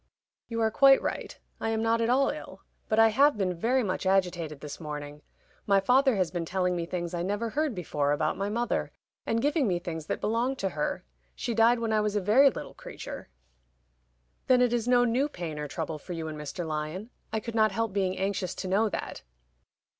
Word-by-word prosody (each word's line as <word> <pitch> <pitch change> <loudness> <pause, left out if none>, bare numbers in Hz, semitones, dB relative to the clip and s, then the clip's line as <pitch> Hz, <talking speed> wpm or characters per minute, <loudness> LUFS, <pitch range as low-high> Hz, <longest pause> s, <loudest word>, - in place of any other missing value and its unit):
"You 230 -1 -3
are 220 0 +2
quite 270 +3 +6
right. - - -4 0.2
I 225 - -2
am 225 0 0
not 230 0 +2
at 230 - +1
all 270 +2 +3
ill. 305 - -9 0.3
But 215 - +1
I 225 0 +7
have 280 +4 +4
been 190 -3 0
very 240 +9 +1
much 185 -1 -2
agitated 175 -6 0
this 145 +1 -8
morning. 150 -2 -7 0.5
My 200 -1 +5
father 255 +5 +4
has 185 -4 0
been 175 0 -2
telling 180 +1 0
me 170 -1 -3
things 175 -1 -4
I 170 - -2
never 205 +5 -2
heard 295 -3 -1
before 145 -5 -1
about 145 - 0
my 200 +1 -2
mother, 235 +3 -1 0.4
and 230 0 0
giving 290 -2 +2
me 180 -3 +1
things 160 -3 -6
that - - -2
belonged 235 +5 0
to 195 - -1
her. 150 -4 -3 0.3
She 235 - -3
died 230 +2 +5
when 230 -1 -1
I 215 - +3
was 210 0 -1
a - - +3
very 225 +9 +5
little - - -7
creature." - - -9 1.2
"Then 255 -1 +5
it 245 -1 +3
is 240 -1 0
no 245 0 +5
new 255 +5 +1
pain 165 - -6
or 150 - -3
trouble 160 0 -4
for 180 - -7
you 165 -1 -4
and 155 - -5
Mr. 150 +3 -5
Lyon? 155 +8 -4 0.2
I 220 - 0
could 230 +2 -7
not 220 -1 +3
help 225 -3 -2
being 190 -2 0
anxious 195 -1 -2
to - - -5
know 210 +4 +2
that." - - -5
205 Hz, 215 wpm, -28 LUFS, 175-230 Hz, 1.2 s, I